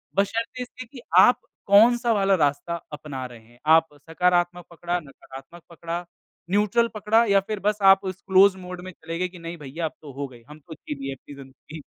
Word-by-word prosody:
बस 200 0 +3
शर्त 230 +4 -4
इसके 250 0 -8
कि 245 +1 -13 0.2
आप 245 - +6 0.3
कौन-सा 235 +4 +5
वाला 195 -2 +3
रास्ता 145 +1 0 0.2
अपना 140 -3 -6
रहे 120 -2 -11
हैं। 120 +1 -23
आप 160 0 +6 0.2
सकारात्मक 175 0 +1
पकड़ा, 175 +1 -3
नकारात्मक 140 +2 -13
पकड़ा, 170 +1 -6 0.4
न्यूट्रल 210 +4 +2
पकड़ा 215 +2 +2
या 200 -2 +4
फ़िर 215 -2 -3
बस 210 - +1
आप 195 +1 +3
उस 185 0 -5
क्लोज़ 190 0 +5
मोड 180 -1 -8
में 185 - -8
चले 165 -1 -7
गए 185 - 0
कि 180 0 -14
नहीं 170 +1 -7
भैया 150 +3 -5
अब 155 - -4
तो 150 - -10
हो 140 +1 -5
गई। 120 -3 -16
हम 150 +1 -12
ख़ुद 160 +2 -12
की 150 - -3
भी 135 0 -4
ऐप 135 - -14
कि - - -9
ज़िंदगी। 140 +3 -12
175 Hz, 210 wpm, -24 LUFS, 150-200 Hz, 0.4 s, आप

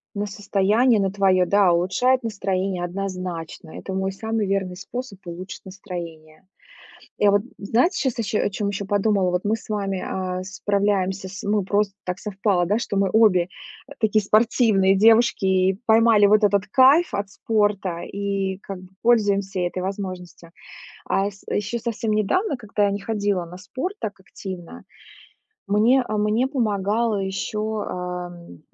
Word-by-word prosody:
На 205 +1 -2
состояние 205 +4 +2
на 195 -1 +1
твоё, 190 -2 +3
да, 200 -3 +4
улучшает 245 +10 +2
настроение, 195 -4 -2
однозначно. 180 -3 -5
Это 190 - -7
мой 190 0 -1
самый 220 +1 -2
верный 190 -2 -1
способ 240 +3 -7
улучшить 180 +4 -8
настроение. 170 -4 -9 0.7
Я 205 -1 +4
вот 205 - +3 0.2
знаете, 245 - +1
щас 255 -4 -1
ещё 220 0 0
о - - +1
чём 200 +1 -2
ещё 200 0 -4
подумала. 200 -2 +1
Вот 180 +1 -1
мы 210 +2 +1
с 225 - -12
вами, 195 -3 -2
а, 185 -1 -3
справляемся, 195 -1 -1
с 195 +2 -8
ну 205 0 0
просто 200 +1 0
так 180 +1 -4
совпало, 195 -3 0
да, 205 +4 +2
что 220 -3 -3
мы 195 -1 +2
обе, 210 -6 +4 0.4
э, 285 - -11
такие 215 -1 +2
спортивные 215 -3 +3
девушки 225 0 +4
и 190 0 +2
поймали 220 -2 +5
вот 210 +1 +4
этот 200 0 +2
кайф 270 - +5
от 200 0 -3
спорта 205 -6 0
и 195 -1 -3
как 195 -3 -8
бы 185 - -14
пользуемся 200 -5 +2
этой 175 +1 -2
возможностью. 185 -3 -6 0.6
А 195 +1 +1
йс 200 -1 -14
ещё 210 +3 -2
совсем 225 -1 -3
недавно, 260 - +1
когда 215 -3 -1
я - - +1
не 200 +1 -3
ходила 205 -4 -1
на 180 +2 -11
спорт 260 - -5
так 205 -2 -4
активно, 185 -2 -9 0.9
мне, 225 +6 +4
э, - - -3
мне 210 +4 +2
помогало 220 -3 0
ещё, 210 +2 -3
ам, 175 - -6
200 Hz, 155 wpm, -23 LUFS, 190-215 Hz, 0.9 s, поймали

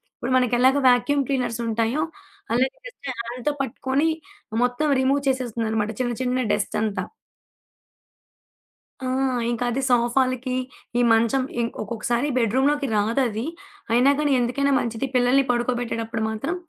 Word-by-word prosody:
ఇప్పుడు 250 +2 -3
మనకు 250 -2 +1
ఎలాగ 260 +2 +5
వాక్యూమ్ 250 +3 +3
క్లీనర్స్ 245 -4 -1
ఉంటాయో, 230 +6 0 0.5
అలాగ 255 +3 +3 0.2
జస్ట్ - - -8
హ్యాండ్‌తో 240 +4 -2
పట్టుకొని 270 +3 0 0.6
మొత్తం 245 +5 0
రిమూవ్ 275 +2 +2
చేసేస్తుందనమాట. 225 -4 -1
చిన్న 245 -1 0
చిన్న 255 0 0
డస్ట్ 210 +1 -1
అంతా. 215 -2 -1 2.0
ఆ! - - -4 0.5
ఇంకా 240 +1 -2
అది 265 +3 -1
సోఫాలకి, 255 +1 +1 0.4
ఈ - - +4
మంచం 230 +4 +2 0.2
ఇంక్ 230 - -3
ఒక్కొక్కసారి 235 +4 -1
బెడ్‌రూమ్‌లోకి 265 +5 +2
రాదది. 225 +2 0 0.5
అయినా 250 +4 +5
గానీ, 295 -1 +1
ఎందుకైనా 265 +4 +1
మంచిది, 235 +2 -2
పిల్లల్ని 250 +2 +4
పడుకోబెట్టేటప్పుడు 240 -2 -2
మాత్రం, 245 +11 -3
245 Hz, 120 wpm, -23 LUFS, 230-265 Hz, 2.0 s, ఎలాగ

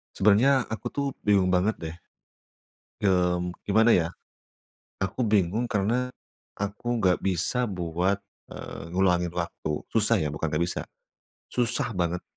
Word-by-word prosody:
Sebenarnya 115 +7 +5
aku 110 - -4
tuh 140 - -1 0.2
bingung 100 -3 +4
banget 95 +4 +2
deh. 80 0 -5 1.1
Mmm, 90 -2 +2 0.2
gimana 110 +3 +4
ya. 85 -2 +2 1.0
Aku 95 +6 -2
bingung 105 +3 +2
karena, 115 +4 +1 0.5
aku 105 +4 -2
nggak 90 -2 +4
bisa 95 +7 0
buat, 90 +2 -1 0.3
eee, 85 - -8
ngulangin 90 -2 +2
waktu. 85 -3 -3
Susah 115 +1 +3
ya, 75 - -1
bukan 75 +2 -2
nggak 75 +2 0
bisa, 85 0 -2 0.7
susah 125 +1 0
banget, 90 -2 -1
95 Hz, 125 wpm, -27 LUFS, 90-110 Hz, 1.1 s, Sebenarnya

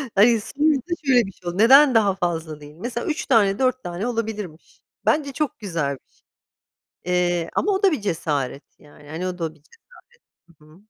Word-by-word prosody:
Hayır 225 +3 +5
sonuçta 295 +5 0
şöyle 250 -5 +4
bir 195 - -8
şey 175 -1 -8
oldu, 175 - -6
neden 265 +4 +7
daha 200 -4 +3
fazla 165 -4 -3
değil? 145 +1 -13
Mesela 235 +6 -5
3 310 0 -2
tane 205 -5 +3
4 255 -1 +1
tane 175 +6 -4
olabilirmiş. 215 -8 -5 0.2
Bence 285 -3 +1
çok 300 -4 -3
güzel 165 -9 -2
bir - - -18
şey, - - -33 0.8
eee, 175 -1 0
ama 410 - +1
o 385 +1 -1
da 385 - +5
bir 290 - -2
cesaret 145 -8 -2 0.2
yani, 145 0 -17
hani 170 +4 -4
o 180 -1 -5
da 160 -1 -3
bir 150 - -26 0.7
cesaret. 170 -3 -29
Hı - - -19
hı. 155 +4 -19
195 Hz, 195 wpm, -22 LUFS, 165-250 Hz, 0.8 s, neden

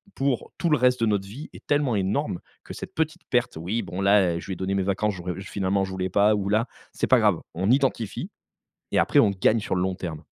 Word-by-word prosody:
pour, 135 -2 -1
tout 170 - +1
le 150 - +4
reste 125 -1 +2
de 115 - +3
notre 100 -2 0
vie 130 +10 -9
est - - -13
tellement 145 -5 +1
énorme, 100 - -1 0.2
que - - -9
cette - - -8
petite 155 -1 -2
perte. 125 -8 0
«Oui, 100 +8 -2
bon 90 - -6
là, 100 -3 +4
heu, - - -3
je - - -10
lui 95 - -3
ai - - -5
donné 95 +2 -2
mes 95 - +1
vacances 100 +2 0
j'aurais 90 0 -4
finalement, 100 0 -1
je 95 - -3
voulais 95 0 -2
pas 105 +3 +4
ou 100 -1 -2
la», 110 +4 +2 0.3
c'est - - -1
pas - - +5
grave, - - +2
on 95 +4 0
identifie 130 -6 0 0.6
et - - +2
après - - +4
on 100 - +4
gagne 100 +4 +2
sur 100 - -2
le 90 - +1
long 95 0 0
terme. 80 -4 -6
100 Hz, 255 wpm, -25 LUFS, 95-120 Hz, 0.6 s, pas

